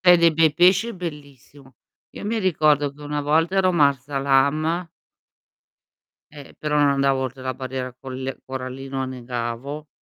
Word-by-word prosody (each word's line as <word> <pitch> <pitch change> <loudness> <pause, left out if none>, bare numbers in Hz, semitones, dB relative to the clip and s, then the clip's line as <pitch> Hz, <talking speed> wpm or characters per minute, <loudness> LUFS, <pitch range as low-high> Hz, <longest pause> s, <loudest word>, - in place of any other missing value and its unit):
Se 180 - +6
hai 175 - +9
dei 170 -1 +5
bei 160 -1 +3
pesci 185 +6 +4
è 235 - -6
bellissimo. 145 -5 -10 0.4
Io - - -9
mi 225 +2 -1
ricordo 150 -7 +2
che 150 - -15
una 145 0 -3
volta 160 +6 +1
ero 185 -1 +3
Marsa 140 -3 +1
Alam 140 +5 +2 1.5
eh, 145 -2 -12
però 150 -1 -1
non 145 - +4
andavo 140 -1 +2
oltre 130 0 -5
la 130 0 -3
barriera 130 0 -5
colle 130 +1 -6
corallina 130 +1 -6
o - - -1
annegavo, 125 +3 -5
140 Hz, 160 wpm, -23 LUFS, 130-160 Hz, 1.5 s, hai